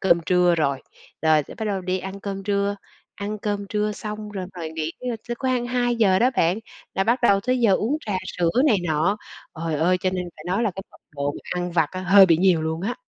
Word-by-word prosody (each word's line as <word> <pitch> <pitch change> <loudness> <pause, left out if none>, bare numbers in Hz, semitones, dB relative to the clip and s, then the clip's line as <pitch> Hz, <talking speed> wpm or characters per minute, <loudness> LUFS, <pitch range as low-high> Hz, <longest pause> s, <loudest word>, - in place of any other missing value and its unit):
cơm 170 -3 +4
trưa 180 -1 +4
rồi. 140 -4 0 0.4
Rồi 155 -1 +4
tới - - -11
bắt 220 - -5
đầu 200 -2 -1
đi 185 +1 -1
ăn 190 +1 -7
cơm 195 -1 -5
trưa, 200 0 0 0.4
ăn 210 +1 -4
cơm 205 -1 -3
trưa 210 0 0
xong 210 0 -6
rồi 190 -3 -5
ngồi 165 -2 -4
nghỉ 160 0 -3
trưa 250 -2 -3
tới 240 - -1
khoang 255 -1 -1
2:00 240 -6 +2
đó 245 +5 +4
bạn, 170 +5 +2 0.4
là 195 - +1
bắt 235 +4 +2
đầu 200 -4 +4
tới 255 +5 0
giờ 225 -4 +4
uống 235 +10 0
trà 205 - -1 0.2
sữa 175 -2 +2 0.2
này 220 -8 +5
nọ. 160 +6 +1 0.5
Trời 165 -1 -1
ơi, 175 +5 +2
cho 185 - +1
nên 180 -1 -2
phải 155 - -12
nói 190 +6 0
là 215 - +1
cái 195 - -6
mật - - -18 0.2
độ 140 0 -1
mình - - -10 0.2
ăn 175 - -5
vặt 160 -3 +2
á 185 - -5
hơi 195 +1 +7
bị 165 - +4
nhiều 175 -2 +3
luôn 160 +1 -2
á. 230 +5 -1
195 Hz, 245 wpm, -23 LUFS, 170-210 Hz, 0.5 s, hơi